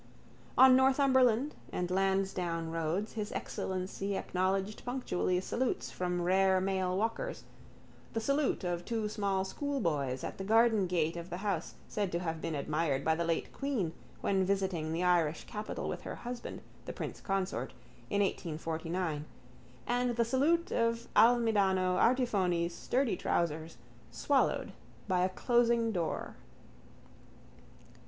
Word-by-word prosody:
On 260 0 +9
Northumberland 260 0 +4 0.2
and 180 0 -2
Lansdowne 185 -3 0
roads 165 +6 -2
His 215 -2 -4
Excellency 190 +1 -3
acknowledged 190 +3 -1
punctually 215 -8 -1
salutes 250 +6 -2
from 180 -1 -2
rare 190 +1 +4
male 185 -1 0
walkers, 230 - -2 0.7
the 225 - 0
salute 275 +1 0
of 175 -1 -2
two 225 +1 -2
small 200 -2 -1
schoolboys 165 - -2
at - - -5
the - - -3
garden 220 -1 +4
gate 170 -2 0
of 170 +1 -6
the 175 - -4
house 185 -5 -2
said 205 -3 -2
to - - +2
have 165 -2 -3
been 160 - -2
admired 145 -1 -1
by 160 - +4
the 170 +1 -1
late 165 -1 -1
queen 245 - -1 0.3
when 195 -1 +2
visiting 185 -5 0
the 165 +2 -1
Irish 170 -3 +2
capital 210 0 -5
with - - -4
her - - -6
husband, 240 0 -6 0.2
the - - -5
prince - - -6
consort, 195 -1 -2 0.4
in 205 - +1
1849 165 -2 -2 0.6
and 245 0 0
the 235 0 +2
salute 295 +8 +2
of 230 0 0
Almidano 205 -5 +4
Artifoni's 190 -9 +2
sturdy 250 +3 0
trousers 160 -2 -1 0.3
swallowed - - +1 0.3
by 180 -2 +2
a 185 - +2
closing 235 +2 +2
door. 175 -5 -3
190 Hz, 135 wpm, -32 LUFS, 175-230 Hz, 0.7 s, On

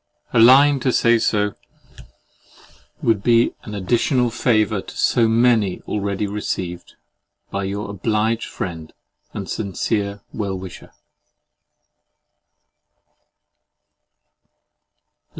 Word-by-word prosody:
A - - +3
line 135 +4 +7
to 130 - 0
say 120 -1 +3
so 105 -2 0 1.5
would 110 -3 +2
be 115 +1 +3
an 105 - -8
additional 120 - +1
favour 110 -3 +1
to - - -12
so 115 -2 +3
many 115 -4 +2
already 100 0 -3
received 95 -4 -5 0.6
by 100 0 -2
Your 100 +2 -4
obliged 110 +3 -1
friend, 80 -3 -6 0.4
And - - -6
sincere 100 0 -2
well 100 -3 -3
wisher. 95 -1 -10
105 Hz, 90 wpm, -20 LUFS, 100-115 Hz, 1.5 s, line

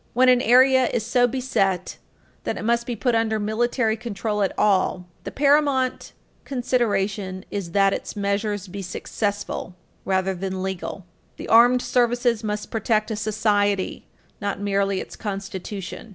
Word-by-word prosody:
When 255 +1 +5
an 250 -1 +5
area 260 +1 +5
is 220 -2 -2
so 245 +1 +3
beset 195 -8 -1 0.5
that - - -2
it - - -5
must 235 +1 +1
be 240 - -2
put 240 +3 0
under 225 -1 +1
military 220 +2 0
control 220 -2 -3
at 195 - +1
all, 190 -3 +2 0.2
the - - -4
paramount 280 -2 +2 0.3
consideration 205 -7 -1
is 190 -5 -4
that 195 -1 +4
its - - -5
measures 205 0 -1
be 200 +2 -6
successful, 200 0 -4 0.3
rather 190 0 0
than 190 0 -4
legal. 190 0 -5 0.3
The - - -7
armed 245 +2 +6
services 240 -2 +1
must 210 -1 -3
protect 220 -1 0
a - - -1
society, 205 -2 0 0.3
not 200 0 -2
merely 200 -1 0
its - - -9
Constitution. 195 0 -6
210 Hz, 145 wpm, -23 LUFS, 195-240 Hz, 0.5 s, armed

